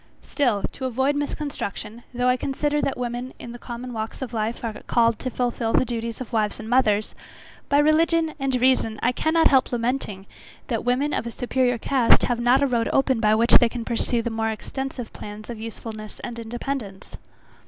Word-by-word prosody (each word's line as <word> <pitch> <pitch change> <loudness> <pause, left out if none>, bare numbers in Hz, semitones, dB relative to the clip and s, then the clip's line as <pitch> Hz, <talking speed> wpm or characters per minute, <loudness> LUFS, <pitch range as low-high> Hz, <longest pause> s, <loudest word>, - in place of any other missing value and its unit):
Still 240 -9 0
to 260 - -6
avoid 265 +3 +1
misconstruction, 285 -6 -4
though 245 0 0
I 250 - +4
consider 295 +3 -1
that 275 - -1
women 245 +1 -4
in 235 - -8
the 240 - -9
common 245 +1 -7
walks 220 +3 -4
of 250 -2 -7
life 225 +2 -2
are 230 -2 -2
called 230 -2 +3
to 255 - -3
fulfil 240 -2 -1
the - - +4
duties 230 -1 -4
of 255 -1 -7
wives 215 -2 0
and 220 - -7
mothers, 215 -4 +2 0.6
by 285 - +4
religion 320 +2 +3
and 270 -1 0
reason, 245 -4 +2
I 245 - +4
cannot 320 +5 +3
help 265 -2 +3
lamenting 235 -5 -2 0.4
that 230 -3 -1
women 260 +4 +1
of 235 - -1
a - - -2
superiour 245 +1 0
cast 250 +1 +3
have 245 -1 0
not 245 +3 +4
a - - +5
road 235 -3 0
open 265 -3 +2
by 215 -1 +4
which 230 +2 +3
they 240 -3 +3
can 235 -1 -5
pursue 235 0 0
more 225 -1 -1
extensive 250 +2 -5
plans 210 +2 -8
of 230 - -7
usefulness 220 -1 -8
and 235 -1 -6
independence. 230 -3 -5
240 Hz, 190 wpm, -24 LUFS, 225-265 Hz, 0.6 s, a